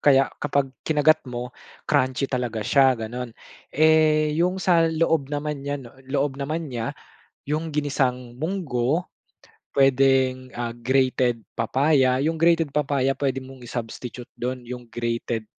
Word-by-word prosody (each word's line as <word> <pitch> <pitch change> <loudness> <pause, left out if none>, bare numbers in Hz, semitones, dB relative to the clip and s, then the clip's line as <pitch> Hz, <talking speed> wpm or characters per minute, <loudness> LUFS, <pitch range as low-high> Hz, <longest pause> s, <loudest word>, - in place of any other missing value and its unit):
kaya 135 -2 +4
kapag 140 -2 0
kinagat 155 0 +3
mo, 125 +1 -5 0.3
crunchy 130 +1 +1
talaga 125 -5 -2
siya, 135 +1 +4
ganon. 115 +1 -6 0.3
Eh, 155 0 +4
yung 180 +2 +2
sa 170 -3 +3
loob 160 -3 +1
naman 145 0 -3
niya, 145 +1 -3
no, 125 -4 -11 0.2
loob 140 0 -1
naman 155 +1 -3
niya 115 -2 -3 0.5
yung 155 +1 -2
ginisang 125 -4 -1
munggo. 155 -2 -1 0.7
Pwedeng, 130 -1 +3
ah, 120 -1 -3
grated 125 0 +1 0.2
papaya, 130 +2 +2
yung 155 +4 +1
grated 165 -2 +2
papaya 135 -2 +1
pwede 135 -2 -1
mong 130 -1 -11
i-substitute 120 0 -7
dun 125 0 -4
yung 125 -1 -8
grated 115 -1 -3
135 Hz, 130 wpm, -24 LUFS, 125-150 Hz, 0.7 s, kaya